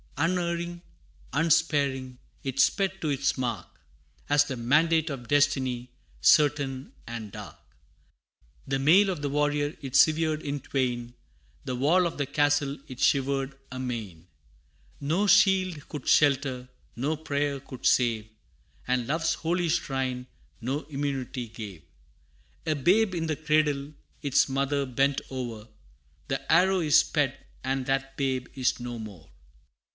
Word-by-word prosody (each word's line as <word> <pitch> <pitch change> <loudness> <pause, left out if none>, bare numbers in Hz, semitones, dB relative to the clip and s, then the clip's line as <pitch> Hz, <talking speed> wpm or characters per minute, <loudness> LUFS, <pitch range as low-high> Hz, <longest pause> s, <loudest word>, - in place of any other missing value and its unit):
Unerring, 170 +1 -1 0.5
unsparing, 140 -5 +1 0.2
it 135 0 -4
sped 190 +4 +2
to 155 - -1
its 140 -1 0
mark, 120 -8 -2 0.6
As 145 0 +5
the 135 - -4
mandate 155 +7 +2
of 130 -5 -6
destiny, 130 -4 +1 0.3
certain 140 -3 +3
and 115 -3 -6
dark. - - -9 1.1
The 135 0 0
mail 180 +9 +5
of 170 -6 -3
the 145 - 0
warrior 145 +1 0
it 135 -2 -6
severed 155 -1 +4
in 145 0 -3
twain, 120 -3 -2 0.5
The 125 - -2
wall 160 +8 +3
of 165 -3 -3
the 140 - 0
castle 145 0 +1
it 130 - -10
shivered 135 0 +1
amain: 115 -10 -5 0.7
No 165 +8 +1
shield 190 -6 +3
could 145 -4 -7
shelter, 135 -3 +2 0.3
no 140 +6 -1
prayer 145 -2 -1
could 130 -2 -10
save, 115 -4 +2 0.6
And 125 -2 0
Love's 160 +3 0
holy 170 +1 -1
shrine 130 -6 -1 0.3
no 135 +6 -2
immunity 135 -4 -4
gave. 105 -6 -9 0.9
A 155 - +2
babe 185 +8 +3
in 165 -1 -1
the 155 -1 -1
cradle 150 -2 +1 0.3
its 140 -1 +2
mother 140 +1 0
bent 135 +2 +1
o'er, 120 -4 -5 0.6
The 135 0 -3
arrow 185 +3 +5
is 155 -2 +5
sped, 145 -4 0 0.2
and 130 0 -2
that 135 0 -1
babe 130 -2 -1
is 130 -2 0
no 120 -1 -5
more! 105 -7 -9
140 Hz, 130 wpm, -27 LUFS, 130-155 Hz, 1.1 s, As